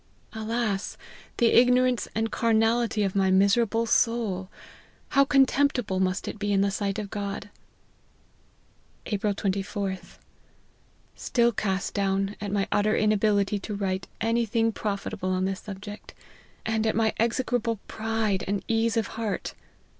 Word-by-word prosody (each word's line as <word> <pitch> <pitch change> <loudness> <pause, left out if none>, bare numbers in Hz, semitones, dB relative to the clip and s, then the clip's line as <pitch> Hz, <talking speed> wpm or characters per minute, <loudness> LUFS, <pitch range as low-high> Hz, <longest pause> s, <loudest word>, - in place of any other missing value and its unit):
Alas! 220 -2 -2 0.4
the 235 -1 +4
ignorance 250 0 +4
and 225 +1 0
carnality 225 -1 +2
of 195 -1 -1
my 190 -1 +3
miserable 200 +4 +3
soul! 220 -5 +1 0.6
how 275 - +5
contemptible 270 -6 +2
must 185 +1 0
it - - -5
be 205 0 -1
in 195 -1 +3
the 200 0 +2
sight 200 0 -2
of 210 -2 -5
God 205 0 -4 0.4
!" - - -36
" - - -36
Jlpril 205 -1 -1
%4:th. 195 -1 -3 1.0
Still 235 -1 +1
cast 195 -3 -2
down 195 0 0
at 205 -1 -3
my 200 -1 0
utter 215 +1 +2
ina 215 0 +3
bility 205 -1 +1
to 210 - -5
write 190 -2 -2
anything 225 0 +1
profitable 200 -2 -3
on 185 0 0
this 190 0 -2
subject; 205 +1 -9 0.5
and 220 0 0
at 220 - +1
my 220 -1 +2
execrable 230 0 0
pride 220 -3 -1
and 200 0 -2
ease 225 0 +1
of 225 - +2 0.2
heart. 215 -3 -3
210 Hz, 140 wpm, -26 LUFS, 195-230 Hz, 1.0 s, how